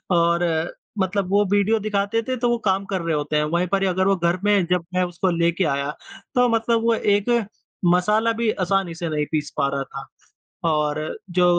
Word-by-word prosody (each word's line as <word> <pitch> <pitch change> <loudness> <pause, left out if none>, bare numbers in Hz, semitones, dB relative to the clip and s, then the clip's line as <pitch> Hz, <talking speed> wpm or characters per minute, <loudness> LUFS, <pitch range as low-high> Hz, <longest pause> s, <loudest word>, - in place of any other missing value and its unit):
और 170 0 +3
अ, 160 -1 +1 0.3
मतलब 190 0 0
वो 205 +1 +4
वीडियो 205 +2 +3
दिखाते 210 +1 0
थे 255 - 0
तो 240 0 +1
वो 240 - +2
काम 195 0 +1
रहे 170 -3 -1
होते 150 0 -2
हैं 150 - +2
वहीं 175 +1 +1
पर 195 +1 0
अगर 190 +1 +1
वो 195 - +4
घर 170 0 0
में 205 -3 +3
जब 180 -2 +1
मैं 185 - +3
उसको 180 +1 -1
लेके 170 +2 +1
आया 140 -1 -1 0.5
तो 250 0 +4
मतलब 230 0 +1
वो 230 0 +3
एक 205 0 +1 0.6
मसाला 210 +5 +2
भी 225 - +2
आसानी 190 -3 -1
से 170 -1 -4
नहीं 150 -1 -1
पीस 150 -2 -1
पा 140 - +2
रहा 140 - -1
था। 135 0 -9 0.6
और 150 -1 0 0.3
जो 180 0 +2
185 Hz, 200 wpm, -22 LUFS, 170-205 Hz, 0.6 s, वो